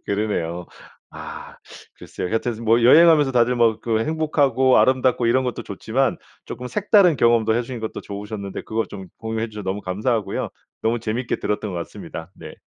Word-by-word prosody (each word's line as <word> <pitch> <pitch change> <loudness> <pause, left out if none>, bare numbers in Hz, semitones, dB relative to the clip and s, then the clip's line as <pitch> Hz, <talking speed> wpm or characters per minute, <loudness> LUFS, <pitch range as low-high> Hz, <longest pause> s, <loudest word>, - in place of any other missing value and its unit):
그러네요. 95 -5 -2 0.5
아 - - -9 0.4
글쎄요. 90 - -6
하여튼 115 +3 -1
스 110 - -10
뭐 115 +1 +3
여행하면서 150 +2 +6
다들 125 0 +3
뭐 115 -2 +3
그 110 -1 0
행복하고 145 -5 +2
아름답고 130 -2 +3
이런 130 +3 +2
것도 125 -2 -3
좋지만 115 +6 -1 0.3
쪼끔 125 - -6
색다른 200 - +3
경험도 115 -2 +3
해 120 - +2
주신 120 0 -6
것도 110 - -5
좋으셨는데 100 -1 -6
그걸 110 +1 -2
좀 95 -2 -9
공유해 110 0 -3
주셔서 105 -1 -7
너무 95 +2 -3
감사하고요. 105 +4 -1 0.3
너무 115 +2 +1
재미있게 115 +2 -2
들었던 105 -1 -3
것 - - -4
같습니다. 85 0 -7
네. - - -11
115 Hz, 405 characters per minute, -22 LUFS, 105-130 Hz, 0.5 s, 여행하면서